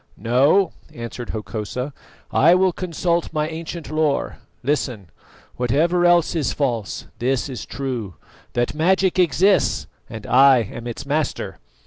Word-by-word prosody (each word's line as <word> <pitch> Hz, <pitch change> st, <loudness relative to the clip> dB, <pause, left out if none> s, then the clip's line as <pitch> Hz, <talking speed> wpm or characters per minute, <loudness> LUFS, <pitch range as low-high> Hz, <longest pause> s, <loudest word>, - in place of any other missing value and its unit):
"No," 140 Hz, -, +3 dB, 0.2 s
answered 120 Hz, 0 st, -7 dB
Hokosa; 110 Hz, +5 st, -4 dB, 0.4 s
"I 165 Hz, +5 st, +5 dB
will 185 Hz, 0 st, +3 dB
consult 170 Hz, -1 st, -1 dB
my 155 Hz, -1 st, 0 dB
ancient 160 Hz, -1 st, -6 dB
lore. 155 Hz, -2 st, 0 dB, 0.3 s
Listen. 125 Hz, -, -2 dB, 0.5 s
Whatever 165 Hz, +9 st, +2 dB
else 175 Hz, -1 st, +4 dB
is 155 Hz, -4 st, 0 dB
false, 120 Hz, -8 st, -2 dB
this 130 Hz, +2 st, 0 dB
is 130 Hz, -4 st, -7 dB
true: 120 Hz, -, -4 dB, 0.4 s
that 120 Hz, 0 st, 0 dB
magic 185 Hz, +4 st, +2 dB
exists, 185 Hz, +3 st, +3 dB, 0.2 s
and 110 Hz, -1 st, -8 dB
I 130 Hz, 0 st, +6 dB
am 120 Hz, +3 st, -8 dB
its 120 Hz, -, -6 dB
master. 150 Hz, +2 st, -2 dB
140 Hz, 125 wpm, -21 LUFS, 120-170 Hz, 0.5 s, I